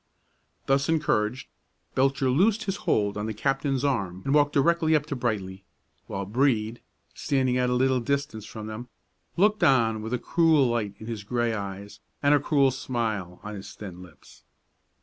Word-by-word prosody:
Thus 135 +2 +1
encouraged, 130 -7 0 0.5
Belcher 135 0 +2
loosed 205 - +3
his 195 -1 -2
hold 105 -1 +1
on 105 +1 -3
the 110 - -4
captain's 135 +3 0
arm 95 -9 -1
and 135 - +1
walked 145 -1 +4
directly 160 +2 +3
up 150 -1 +1
to 145 - -4
Brightly, 100 -6 -3 0.4
while 100 0 -4
Brede, 115 0 0 0.3
standing 130 -3 0
at 125 0 +1
a 125 - +1
little 130 0 +2
distance 120 -4 -2
from 110 -1 -8
them, 110 +3 -7 0.5
looked 210 +3 +3
on 115 -5 +3
with 110 +3 -2
a - - 0
cruel 160 +2 +3
light 115 -4 -1
in 110 - -10
his 110 -2 -5
gray 120 +1 0
eyes 100 -1 -6 0.2
and 145 +1 +5
a 145 - +5
cruel 140 -1 +3
smile 110 -8 -3
on 105 - -6
his 100 -1 -9
thin 95 -4 -9
lips. 90 -5 -16
125 Hz, 170 wpm, -26 LUFS, 105-140 Hz, 0.5 s, and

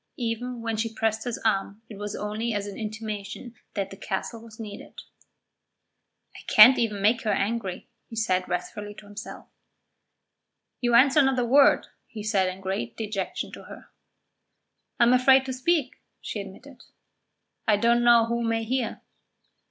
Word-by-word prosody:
Even 240 0 -3
when 225 -1 -2
she 225 +1 -1
pressed 220 0 -1
his 240 -2 -3
arm 200 0 0
it 215 - -10
was 205 +1 -5
only 215 +2 -3
as 205 -1 -2
an 205 - -7
intimation 215 +1 -6 0.2
that 195 -2 -2
the - - -8
castle 215 +4 -4
was 225 -1 -14
needed. 210 -2 -9 1.4
"I - - -10
can't 235 +5 +9
even 210 -4 -1
make 220 +3 +3
her 215 - 0
angry," 200 -2 -2 0.2
he 225 - -10
said 185 -5 0
wrathfully 205 +3 -4
to 210 - -13
himself. 205 +1 -9 1.3
"You 240 -1 +2
answer 270 +4 +6
not 265 -1 +2
a 245 - +1
word," 275 +4 +5 0.2
he 215 -3 -8
said 200 -3 +1
in 185 +1 -8
great 190 -12 -4
dejection 205 -3 -4
to - - -11
her. - - -13 1.1
"I - - +6
am 240 +1 +5
afraid 265 +1 +5
to 260 - -4
speak," 265 +1 0 0.2
she 210 - -5
admitted. 240 +8 -12 0.9
"I 210 -2 +4
don't 235 +2 +3
know 235 -1 +6
who 235 +1 -2
may 225 -1 0
hear." 245 +1 -2
225 Hz, 160 wpm, -26 LUFS, 205-240 Hz, 1.4 s, can't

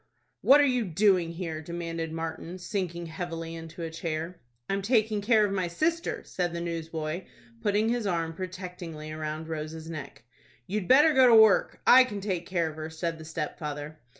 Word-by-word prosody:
"What 280 +2 +7
are 290 - +6
you 250 -3 +2
doing 185 -2 +2
here?" 165 -3 -4
demanded 165 0 -4
Martin, 165 +2 -5
sinking 180 -3 -3
heavily 165 -1 -5
into 165 +1 -8
a 165 - -4
chair. 165 +1 -4 0.3
"I'm 195 0 -1
taking 215 -1 +2
care 215 0 +4
of 200 - -2
my 185 -2 0
sister," 325 - -1
said 175 -2 -2
the 170 - -3
newsboy, 165 0 -4 0.4
putting 210 - +2
his 235 -3 0
arm 165 -3 -1
protectingly 180 -4 -7
round 155 0 -4
Rose's 160 +1 -5
neck. 145 -6 -8 0.4
"You'd 195 +2 -3
better 295 +4 +6
go 260 -2 +7
to 235 - +7
work. 220 -2 +5
I 260 +1 +9
can 210 -5 -5
take 185 -4 -3
care 170 -3 0
of 155 -1 -7
her," 155 0 -5
said 165 0 -3
the 160 - -9
stepfather. 150 -1 -5
170 Hz, 180 wpm, -28 LUFS, 160-200 Hz, 0.4 s, I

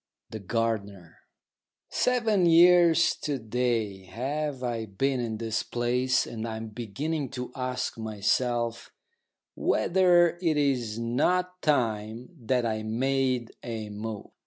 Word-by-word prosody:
THE 110 - -5
GARDENER 100 -5 -3 0.7
Seven 225 -7 +2
years 170 0 +6
to 145 -2 -2
day 110 -4 -2
have 135 +5 -3
I 115 -2 -2
been 130 +7 -1
in 115 -2 -3
this 115 0 -2
place, 125 +1 0
and 115 -1 -5
I 110 -1 -4
am 110 0 -6
beginning 130 +7 -3
to 125 0 -5
ask 125 -2 -3
myself 115 +2 -1 0.6
whether 175 -2 +3
it 160 -4 +1
is 125 -7 0
not 180 +10 0
time 115 -4 0 0.2
that 125 -2 +2
I 110 -1 -1
made 125 +2 0
a 110 -3 -5
move. 105 0 -6
120 Hz, 120 wpm, -27 LUFS, 110-145 Hz, 0.7 s, years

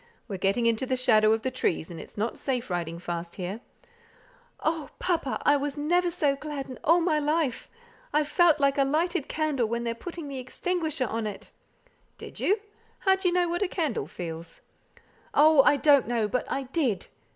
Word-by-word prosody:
"We're 200 -4 -4
getting 195 +5 +1
into 230 +2 +1
the 260 - +1
shadow 220 -4 +4
of 225 0 +1
the 260 - -1
trees, 175 -9 -1
and 165 - -7
it's - - -12
not 220 +3 -2
safe 250 -6 -2
riding 170 -1 -2
fast 170 0 -5
here." 190 +4 -5 1.0
"Oh! 315 -3 -1
papa, 335 -7 -1
I 290 - +6 0.2
never 350 +5 +2
was 345 - -3
so 285 -4 +2
glad 285 -1 -6
in 255 - -9
all 340 +2 +5
my 325 -3 +2
life. 300 -3 -1 0.4
I 300 - +3
felt 320 +1 +3
like 280 0 +2
a - - +6
lighted 310 +3 0
candle 300 -7 0
when 235 +1 -2
they're 230 -1 -1
putting 335 +6 -7
the 275 -2 -5
extinguisher 310 +2 -2
on 225 -1 -2
it." 205 - -8 0.7
"Did - - -10
you? 405 +2 +2 0.4
How 385 -1 +4
d'ye 380 -1 +1
know 355 0 +2
what 345 +2 -2
the 400 - +2
candle 320 - -2
feels?" 165 -1 -7 0.7
"Oh, 305 -1 +7
I 285 - +4
don't 285 -1 +5
know, 230 -3 +1
but 250 +4 -2
I 275 - -1
did." 260 - -1
275 Hz, 190 wpm, -27 LUFS, 225-315 Hz, 1.0 s, Oh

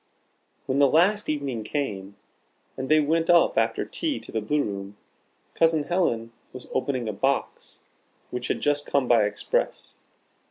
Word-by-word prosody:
When 135 +1 0
the 140 - +6
last 185 +9 +3
evening 140 -7 -2
came, 100 -7 -4 0.6
and 130 0 -5
they 155 0 +6
went 165 +2 +1
up 175 -1 +5
after - - +1
tea 315 -4 -2
to - - -10
the 110 - -1
Blue 145 +7 0
room, 100 0 -6 0.6
Cousin 160 -2 +3
Helen 120 -10 0 0.2
was 130 -1 -9
opening 130 -3 -1
a 110 - -2
box 135 +7 -2 0.5
which 125 0 -3
had - - -2
just 145 0 0
come 140 -3 +1
by 115 -3 +5
Express. 105 - -2
140 Hz, 155 wpm, -25 LUFS, 115-155 Hz, 0.6 s, the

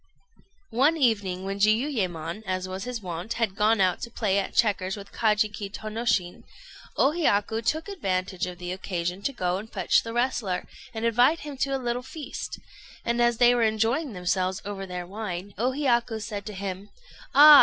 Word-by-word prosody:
One 285 +7 +3
evening, 200 - +1
when 195 +1 -3
Jiuyémon, 210 - +1
as 185 0 -1
was 190 +1 -5
his 245 -4 -5
wont, 175 +3 -4
had 225 -5 -1
gone 215 +1 +3
out 185 -2 +2
to 235 - -4
play 205 -4 +1
at 195 - -4
checkers 200 -3 +2
with 200 0 -10
Kajiki 210 -2 +1
Tônoshin, 215 -4 -1 0.6
O 275 - +5
Hiyaku 225 -8 +1
took 315 - 0
advantage 185 - -2
of 180 -1 -7
the 180 0 -5
occasion 180 -1 -3
to 275 - -1
go 185 -7 -1
and 220 +2 -10
fetch 190 -3 +3
the 230 - -6
wrestler, 235 -6 0 0.3
and 225 -1 -3
invite 245 +8 +4
him 295 -1 -6
to 275 +1 0
a - - +1
little 245 -1 -2
feast; 285 +4 -6 0.5
and 235 +1 +1
as 240 -1 +3
they 245 0 +6
were 240 - +2
enjoying 225 +6 +1
themselves 185 0 0
over 195 -1 -5
their 180 -1 -5
wine, 195 -1 -5
O 245 +3 +2
Hiyaku 240 -5 +1
said 210 -1 -5
to 210 - -5
him 195 +1 -5 0.5
"Ah! 295 0 +11
215 Hz, 180 wpm, -26 LUFS, 185-240 Hz, 0.6 s, Ah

